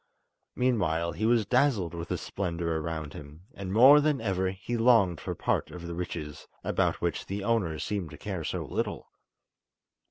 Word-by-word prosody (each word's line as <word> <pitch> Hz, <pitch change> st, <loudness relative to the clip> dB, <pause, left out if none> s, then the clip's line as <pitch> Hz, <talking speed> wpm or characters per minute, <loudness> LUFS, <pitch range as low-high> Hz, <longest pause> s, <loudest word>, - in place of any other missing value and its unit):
Meanwhile 85 Hz, -10 st, +1 dB
he 110 Hz, +7 st, -1 dB
was 115 Hz, -2 st, +3 dB
dazzled 115 Hz, -, +2 dB
with 85 Hz, -1 st, -5 dB
the -, -, -2 dB
splendour 85 Hz, -4 st, -2 dB
around 80 Hz, -2 st, -4 dB
him, 75 Hz, +4 st, -11 dB
and 95 Hz, -2 st, -6 dB
more 130 Hz, +8 st, +8 dB
than 150 Hz, -2 st, +1 dB
ever 95 Hz, -3 st, 0 dB
he 100 Hz, +6 st, -4 dB
longed 115 Hz, -8 st, +4 dB
for -, -, -4 dB
part -, -, 0 dB
of 85 Hz, -1 st, -9 dB
the 85 Hz, -, -5 dB
riches, 75 Hz, -4 st, -6 dB, 0.2 s
about -, -, 0 dB
which -, -, -2 dB
the 100 Hz, +1 st, -4 dB
owners 100 Hz, -9 st, 0 dB
seemed 100 Hz, -6 st, -3 dB
to 75 Hz, -, -11 dB
care 95 Hz, 0 st, -4 dB
so -, -, -3 dB
little. -, -, -3 dB
95 Hz, 170 wpm, -28 LUFS, 85-115 Hz, 0.2 s, more